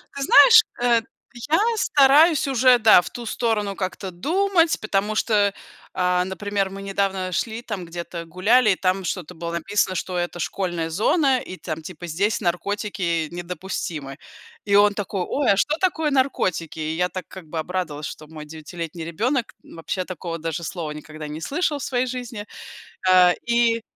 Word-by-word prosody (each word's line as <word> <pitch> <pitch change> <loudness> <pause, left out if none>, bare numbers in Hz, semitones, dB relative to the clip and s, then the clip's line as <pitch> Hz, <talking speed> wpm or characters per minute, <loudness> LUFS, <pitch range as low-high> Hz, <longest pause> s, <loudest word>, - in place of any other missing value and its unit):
Ты 280 - -3
знаешь, 455 - +8 0.2
э, 240 -1 +3 0.5
я 325 - +5 0.2
стараюсь 295 -3 +4
уже, 255 -2 +4
да, 220 -5 +7
в - - -8
ту 240 - -7
сторону 215 -4 -1
как-то 190 0 -4
думать, 335 - +1
потому 210 0 0
что, 210 -2 +2 0.4
а, 180 -1 +1
например, 195 0 -2
мы 195 0 -8
недавно 195 -1 -2
шли, 220 +5 -2
там 205 -7 -5
где-то 170 0 -7
гуляли 210 +7 +3
и - - +2
там 185 +1 0
что-то 180 0 -4
было 170 +1 -5
написано, 185 +3 0
что 180 0 -3
это 175 0 -3
школьная 175 -2 -2
зона 260 - +2
и 185 - -8
там 160 -3 -6
типа 175 0 -8
здесь 200 +8 0
наркотики 180 -2 -1
недопустимы. 170 -5 -5 0.5
И 200 -1 +2
он 205 0 +6
такой: 200 -1 -3
"Ой, 280 -5 +1
а 195 - +2
что 295 +9 +1
такое 320 -5 +1
наркотики?" 255 - 0
И 155 0 -2
я 180 +2 0
так 185 -2 -7
как 190 -3 -11
бы 160 +1 -4
обрадовалась, 155 -3 -3
что 155 - -10
мой 155 -1 -10
девятилетний 160 +2 -7
ребенок, 235 - -1
вообще, 180 +3 -5
такого 170 -2 -6
даже 165 +1 -4
слова 165 -2 -4
никогда 155 0 -8
не 150 +2 -7
слышал 300 - -1
в 280 - -6
своей 255 0 0
жизни. 245 -4 -6 0.6
А, 180 -1 +6
и 235 -1 +2
190 Hz, 170 wpm, -23 LUFS, 170-235 Hz, 0.6 s, знаешь